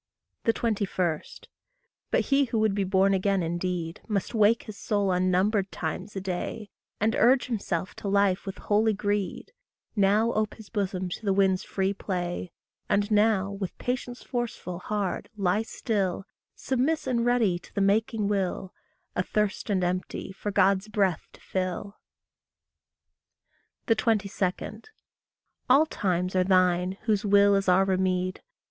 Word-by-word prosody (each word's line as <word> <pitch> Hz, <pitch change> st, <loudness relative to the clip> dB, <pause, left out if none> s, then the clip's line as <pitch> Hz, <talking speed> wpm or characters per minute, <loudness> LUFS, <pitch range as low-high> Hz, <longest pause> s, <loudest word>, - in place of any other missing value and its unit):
21. 195 Hz, -8 st, -1 dB, 0.9 s
But -, -, +2 dB
he 280 Hz, 0 st, +2 dB
who 230 Hz, -2 st, -2 dB
would 215 Hz, -2 st, +2 dB
be 200 Hz, 0 st, 0 dB
born 190 Hz, +1 st, +3 dB
again 195 Hz, -1 st, +1 dB
indeed, 170 Hz, 0 st, -3 dB
Must 205 Hz, 0 st, -2 dB
wake 220 Hz, +1 st, +4 dB
his 215 Hz, -, -9 dB
soul 200 Hz, -1 st, 0 dB
unnumbered 185 Hz, +3 st, +1 dB
times 180 Hz, +5 st, -4 dB
a -, -, -1 dB
day, 190 Hz, +3 st, -4 dB, 0.3 s
And 220 Hz, +2 st, +1 dB
urge 255 Hz, +1 st, +4 dB
himself 195 Hz, -7 st, -3 dB
to -, -, -5 dB
life 200 Hz, -1 st, +2 dB
with 195 Hz, -, -5 dB
holy 215 Hz, +1 st, +2 dB
greed; 205 Hz, -, -2 dB, 0.4 s
Now 210 Hz, +3 st, +3 dB
ope 215 Hz, 0 st, -1 dB
his 220 Hz, -3 st, -13 dB
bosom 190 Hz, -3 st, -2 dB
to 180 Hz, -, -6 dB
the 200 Hz, -, +1 dB
Wind's 190 Hz, -1 st, +2 dB
free 195 Hz, 0 st, -1 dB
play; 180 Hz, -3 st, -4 dB, 0.4 s
And 205 Hz, +1 st, +1 dB
now, 210 Hz, -2 st, +3 dB
with 195 Hz, -2 st, -5 dB
patience 245 Hz, 0 st, -4 dB
forceful, 235 Hz, -8 st, -4 dB
hard, 205 Hz, -1 st, -3 dB
lie 195 Hz, +1 st, +2 dB
still, 200 Hz, -4 st, -2 dB, 0.3 s
Submiss 270 Hz, +5 st, 0 dB
and 245 Hz, -3 st, +1 dB
ready 235 Hz, -7 st, +2 dB
to -, -, -17 dB
the -, -, 0 dB
making 210 Hz, +2 st, +2 dB
will, 190 Hz, -2 st, -1 dB, 0.4 s
Athirst 210 Hz, +4 st, -1 dB
and 190 Hz, -3 st, +1 dB
empty, 185 Hz, +1 st, -3 dB
for 195 Hz, +2 st, -5 dB
God's 195 Hz, 0 st, +3 dB
breath 195 Hz, -5 st, 0 dB
to -, -, -17 dB
fill. 190 Hz, +2 st, -3 dB, 1.9 s
22. 215 Hz, -2 st, 0 dB, 0.9 s
All 275 Hz, +5 st, +6 dB
times 185 Hz, -, -1 dB
are 185 Hz, -, +4 dB
thine 185 Hz, 0 st, +2 dB
whose 215 Hz, -2 st, +1 dB
will 200 Hz, 0 st, +5 dB
is 195 Hz, -1 st, +2 dB
our 185 Hz, +2 st, +5 dB
remede. 185 Hz, -1 st, 0 dB
200 Hz, 140 wpm, -27 LUFS, 185-215 Hz, 1.9 s, All